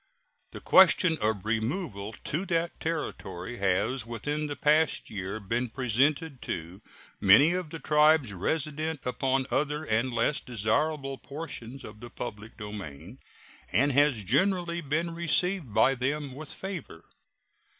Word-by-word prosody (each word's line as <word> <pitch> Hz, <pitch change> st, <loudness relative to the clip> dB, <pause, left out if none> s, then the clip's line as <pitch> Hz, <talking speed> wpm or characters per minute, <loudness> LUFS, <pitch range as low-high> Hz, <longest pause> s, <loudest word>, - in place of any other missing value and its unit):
The -, -, -9 dB
question 180 Hz, -2 st, +6 dB
of 105 Hz, -3 st, -1 dB
removal 110 Hz, -, -2 dB
to 155 Hz, +6 st, -1 dB
that 170 Hz, 0 st, -1 dB
Territory 120 Hz, -, -4 dB
has 100 Hz, +6 st, +1 dB
within 145 Hz, +7 st, -3 dB
the 145 Hz, -, -4 dB
past 155 Hz, +1 st, +2 dB
year 100 Hz, +1 st, -4 dB
been 115 Hz, +4 st, -2 dB
presented 135 Hz, +4 st, 0 dB
to 85 Hz, +4 st, -5 dB, 0.4 s
many 140 Hz, -, +6 dB
of 180 Hz, -3 st, -3 dB
the 165 Hz, -, -6 dB
tribes 150 Hz, -6 st, +3 dB
resident 155 Hz, -, -2 dB
upon 130 Hz, +2 st, 0 dB
other 150 Hz, +2 st, 0 dB
and 120 Hz, -2 st, 0 dB
less 120 Hz, +5 st, +1 dB
desirable 135 Hz, +4 st, -1 dB
portions 140 Hz, -4 st, -7 dB
of 105 Hz, 0 st, -10 dB
the 120 Hz, -, -9 dB
public 110 Hz, -2 st, -7 dB
domain, 105 Hz, -, -8 dB, 0.5 s
and 140 Hz, +9 st, +3 dB
has 140 Hz, -5 st, +3 dB
generally 170 Hz, -, +1 dB
been 165 Hz, +4 st, -1 dB
received 170 Hz, -, 0 dB
by 130 Hz, +6 st, +4 dB
them 135 Hz, +2 st, -2 dB
with 145 Hz, +2 st, -8 dB
favor. 185 Hz, -, -7 dB
135 Hz, 130 wpm, -28 LUFS, 110-155 Hz, 0.5 s, question